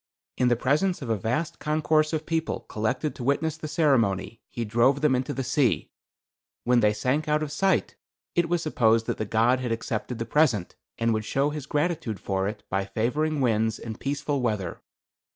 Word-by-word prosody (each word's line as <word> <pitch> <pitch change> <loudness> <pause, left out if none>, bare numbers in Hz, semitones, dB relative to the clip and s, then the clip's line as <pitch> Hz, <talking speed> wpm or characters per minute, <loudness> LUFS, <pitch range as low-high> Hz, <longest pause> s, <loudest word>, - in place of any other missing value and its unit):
In 125 - +2
the 120 - +4
presence 150 +8 +1
of 120 - -3
a - - +3
vast 150 - -2
concourse 155 0 +2
of 155 -1 -2
people 165 -1 -1
collected 125 +8 -2
to 125 - -8
witness 145 +4 +1
the 155 -1 -6
ceremony, 115 - +1
he 120 - -4
drove 120 +6 +3
them 150 -3 +3
into 130 +3 0
the 135 -2 -3
sea. 125 - +1 0.7
When 125 0 +4
they 105 -2 +4
sank 130 +8 0
out 150 0 +2
of 150 - -4
sight 190 +5 +1 0.4
it 170 -1 +1
was 175 -1 +1
supposed 115 -6 +3
that - - -3
the 110 - -1
god 115 +4 +3
had 125 -2 -3
accepted 115 +1 -3
the 115 - -3
present, 115 - +2 0.2
and 115 0 +1
would 110 0 -1
show 135 +6 0
his 150 -2 -6
gratitude 150 - -1
for 95 +1 -1
it 105 - -5
by 95 +1 -1
favoring 140 +9 -1
winds 110 -2 +1
and 110 -1 -7
peaceful 140 0 -1
weather. 105 -8 -2
130 Hz, 190 wpm, -26 LUFS, 110-150 Hz, 0.7 s, the